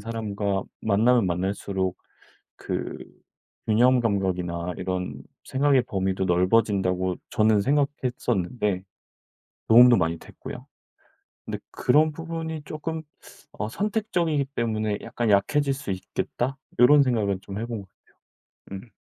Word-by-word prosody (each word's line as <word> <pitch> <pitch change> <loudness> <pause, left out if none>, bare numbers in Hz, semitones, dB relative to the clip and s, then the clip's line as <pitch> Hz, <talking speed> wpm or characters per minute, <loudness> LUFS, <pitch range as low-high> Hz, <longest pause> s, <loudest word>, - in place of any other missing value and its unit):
사람과 105 -3 -2 0.2
만나면 110 +2 +3
만날수록 95 +1 -2 0.6
그 - - -4 0.7
균형 125 +4 +4
감각이나 90 -5 -1
이런 90 -7 -4 0.2
생각의 135 -1 +3
범위도 95 -3 -1
넓어진다고 95 -1 +2
저는 110 -1 +3
생각했었는데 120 -7 0 0.9
도움도 120 +2 +8
많이 85 -2 0
됐고요. - - -10 0.8
근데 - - -4
그런 155 +1 +3
부분이 160 0 -5
쪼끔 160 +1 -5 0.5
어 105 - -4
선택적이기 180 - 0
때문에 110 -3 -1
'약간 120 -2 -2
약해질 140 +8 +3
수 135 -5 -6
있겠다.' 120 +7 -3 0.2
이런 140 +4 +7
생각은 105 -7 0
좀 100 +1 -7
해 115 - -3
본 115 -3 -4
것 95 - -18 0.6
같아요. 100 - -11
음. - - -24
110 Hz, 270 characters per minute, -25 LUFS, 95-135 Hz, 0.9 s, 도움도